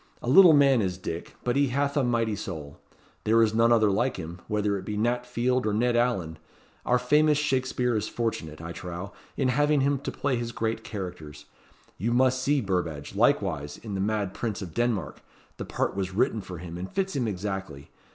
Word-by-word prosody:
A - - -5
little 170 +5 +8
man 140 -4 +5
is 95 -2 -1
Dick, 85 -2 -6
but 120 0 0
he 140 0 +3
hath 140 +3 0
a 145 - +2
mighty 115 -3 +1
soul. 80 -8 -7 0.4
There 115 +2 +3
is 110 -1 +1
none 115 +1 +4
other 110 -3 +4
like 120 +6 0
him, 85 0 -7
whether 105 -1 0
it 95 - -4
be 105 +1 -4
Nat 120 +3 0
Field 125 0 0
or 105 - 0
Ned 120 +3 +2
Alleyn. 95 -10 0 0.5
Our 125 - +4
famous 150 +4 +3
Shakespeare 130 -4 0
is 110 0 -1
fortunate, 80 -10 -3
I 85 +1 -6
trow, 90 +3 -7 0.2
in 130 -2 +2
having 145 +2 +3
him 140 0 +1
to - - -4
play 135 -3 -1
his 120 0 -4
great 110 0 -2
characters. 90 -9 -7 0.5
You 115 +6 0
must 130 +1 +3
see 140 +1 +2
Burbadge, 90 -8 -2
likewise, 95 - +1
in 110 -3 -8
the 95 - -2
mad 105 -2 -1
Prince 110 -3 -3
of 85 -4 -8
Denmark, 120 -5 -1 0.4
the - - -5
part - - -2
was 95 -1 -3
written 110 0 +1
for 90 -2 -8
him, 85 0 -7
and 95 - -6
fits 190 -1 -1
him 125 -4 0
exactly. 95 -7 -5
110 Hz, 200 wpm, -27 LUFS, 95-125 Hz, 0.5 s, little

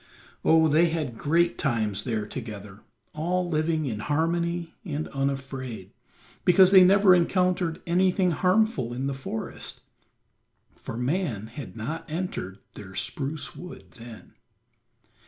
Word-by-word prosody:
Oh, 160 0 +5
they 160 +3 +4
had 155 -7 -3
great 170 +7 +1
times 110 -7 0
there 110 -4 -1
together, 105 -4 -8 0.3
all 175 +4 -1
living 155 -1 0
in 110 -6 -3
harmony 170 +5 -1
and 155 -5 -4
unafraid, 135 -5 -4 0.5
because 185 +1 +6
they 190 -2 +9
never 195 +1 +6
encountered 180 -1 +1
anything 180 +1 +2
harmful 185 - +1
in 130 +2 -3
the 140 - -1
forest, 130 -4 -6 0.9
for 115 - -7
man 125 - -1
had 115 +1 -9
not 150 +10 -5
entered 155 - -4 0.2
their 95 -2 -11
spruce 150 0 -3
wood 180 0 -11
then. 115 -2 -12
155 Hz, 120 wpm, -26 LUFS, 120-175 Hz, 0.9 s, they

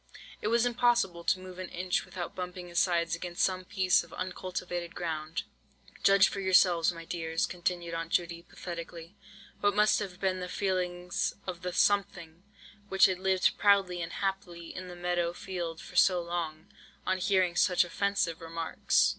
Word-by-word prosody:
It - - -1
was 235 +2 +3
impossible 240 -7 +2
to 185 - +2
move 185 0 -10
an 185 - -5
inch 180 +1 -1
without 180 -2 -6
bumping 180 -1 -6
his 175 - +1
sides 170 -2 +2
against 175 0 -3
some 185 -1 0
piece 190 -2 +3
of 170 - -16
uncultivated 180 -1 -4
ground. 160 -2 -3 0.6
"Judge 195 -1 +6
for - - -4
yourselves, 180 -3 +4
my 165 -1 -9
dears," 165 -1 -1
continued 175 -1 -3
Aunt 165 0 -3
Judy, 170 -1 0
pathetically, 170 +1 -8 0.4
"what 205 -1 +2
must 210 0 +4
have 190 -3 -6
been 190 -1 0
the 180 0 -5
feelings 180 -2 -1
of 180 -2 -5
the 180 0 -3
'something' 175 -4 +1 0.5
which 195 - +6
had 185 -1 +1
lived 190 -1 +2
proudly 195 -3 +3
and 165 - -5
happily 185 -4 -4
in 185 0 -6
the 180 - -8
meadow 175 -1 -1
field 175 -3 -5
for - - -12
so 180 -2 +5
long, 170 -2 -4 0.4
on 185 0 0
hearing 185 -2 +2
such 180 +1 +4
offensive 180 -1 -1
remarks. 165 0 +1
180 Hz, 165 wpm, -30 LUFS, 170-190 Hz, 0.6 s, Judge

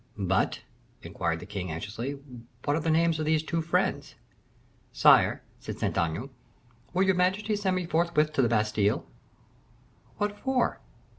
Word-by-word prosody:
"But," 95 -2 0 0.4
inquired 85 -1 -2
the - - -8
king, 95 -2 -5
anxiously, 115 - -5 0.5
"what 145 0 +2
are - - +1
the 165 - -1
names 165 0 +3
of 155 - -1
these 155 0 +2
two 165 +1 -1
friends?" 165 +1 -1 0.8
"Sire," - - +5 0.2
said - - -7
Saint - - -1
Aignan, 85 - -1 0.6
"will 185 +2 +2
your 190 0 +4
majesty 190 +4 +1
send 195 -2 0
me 180 -1 -1
forthwith 160 -2 +1
to 140 - +2
the 120 - +2
Bastile?" 105 -2 +1 1.1
"What 205 0 -2
for?" 265 -2 0
155 Hz, 150 wpm, -28 LUFS, 105-180 Hz, 1.1 s, Sire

